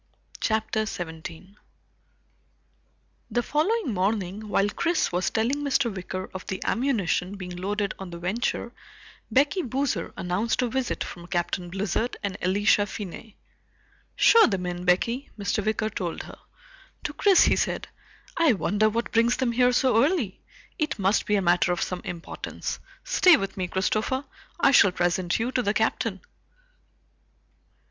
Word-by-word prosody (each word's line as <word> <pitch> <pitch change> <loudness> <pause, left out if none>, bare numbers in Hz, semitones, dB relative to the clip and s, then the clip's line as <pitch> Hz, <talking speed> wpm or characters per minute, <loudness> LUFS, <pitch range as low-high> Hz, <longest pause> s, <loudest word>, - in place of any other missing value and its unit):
CHAPTER 220 0 0
17 170 +2 -7 1.7
The 240 +1 0
following 325 - 0
morning 200 +1 -1
while 200 0 +2
Chris 335 +9 0
was 180 +1 0
telling 230 +5 0
Mr. 265 -6 +1
Wicker 185 0 -5
of 185 - -6
the 190 - -3
ammunition 205 -7 0
being 180 -2 -7
loaded 200 +2 -2
on 195 -2 -7
the 170 - -7
Venture, 215 +6 -2 0.6
Becky 285 +7 +3
Boozer 255 - -2
announced 205 +8 0
a 245 - 0
visit 260 +1 -1
from 175 -2 -9
Captain 175 0 -2
Blizzard 195 +5 -2
and 200 -1 -2
Elisha 205 +2 +3
Finney. 210 +2 -8 0.8
"Show 460 -1 +7
them 190 -5 -2
in, 180 0 -4
Becky," 230 +9 +1
Mr. 205 +1 -1
Wicker 215 +1 -1
told 175 -5 -4
her. - - -12 0.6
To - - -3
Chris 395 -3 +5
he - - +4
said, - - -1 0.5
"I 330 -6 +4
wonder 210 +1 +2
what 230 +2 -2
brings 230 +1 +3
them 260 -2 +1
here 250 +1 +3
so 245 -2 +3
early? 280 - 0 0.4
It 305 -5 -1
must 195 +1 +1
be 210 - +3
a 195 - +1
matter 175 0 +3
of 175 - 0
some 180 -1 -4
importance. 170 -1 -5 0.2
Stay 360 -4 +6
with 195 0 -4
me, 185 -2 -2
Christopher. 215 +9 -1 0.3
I - - +5
shall 200 -7 +6
present 175 0 0
you 235 +3 -1
to 255 - +1
the 205 -2 0
Captain." 220 -3 0
210 Hz, 150 wpm, -26 LUFS, 185-245 Hz, 1.7 s, Show